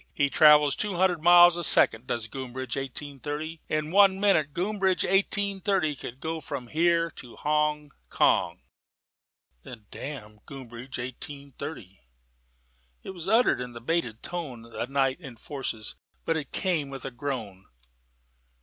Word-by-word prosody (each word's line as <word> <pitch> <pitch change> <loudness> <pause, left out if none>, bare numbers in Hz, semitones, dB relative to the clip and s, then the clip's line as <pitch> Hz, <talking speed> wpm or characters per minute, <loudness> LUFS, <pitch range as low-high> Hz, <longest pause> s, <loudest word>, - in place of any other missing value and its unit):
He 140 -1 +1
travels 150 -2 +6
two 205 -3 -2
hundred 180 -2 +2
miles 175 +1 +7
a 175 - -3
second, 115 -5 +3
does 115 -2 -2
Groombridge 130 -1 -5
Eighteen 135 +1 -5
thirty. 155 +3 -5
In 155 0 -1
one 195 0 +5
minute 190 -8 +3
Groombridge 190 +2 0
Eighteen 200 0 +1
thirty 185 -7 +1
could 125 -1 -8
go 160 +2 -4
from 130 -5 -6
here 165 +1 +2
to 125 -5 -12
Hong 150 -1 0 0.2
Kong." - - +2 1.0
"Then 110 - -11
damn 105 -7 -8
Groombridge 130 -2 -8
Eighteen 140 +3 -7
thirty!" 120 - -8 1.0
It - - -6
was 180 -1 -6
uttered 225 - +3
in 125 -1 -6
the 115 - -8
bated 120 -4 -2
tone 150 -10 -6
that 115 +2 -6
night 135 +1 +1
enforces: 125 -5 -5 0.3
but 165 - +1
it 150 -4 -4
came 165 -7 0
with 135 0 -8
a 135 - -4
groan. 120 -8 -5
145 Hz, 145 wpm, -27 LUFS, 130-170 Hz, 1.0 s, miles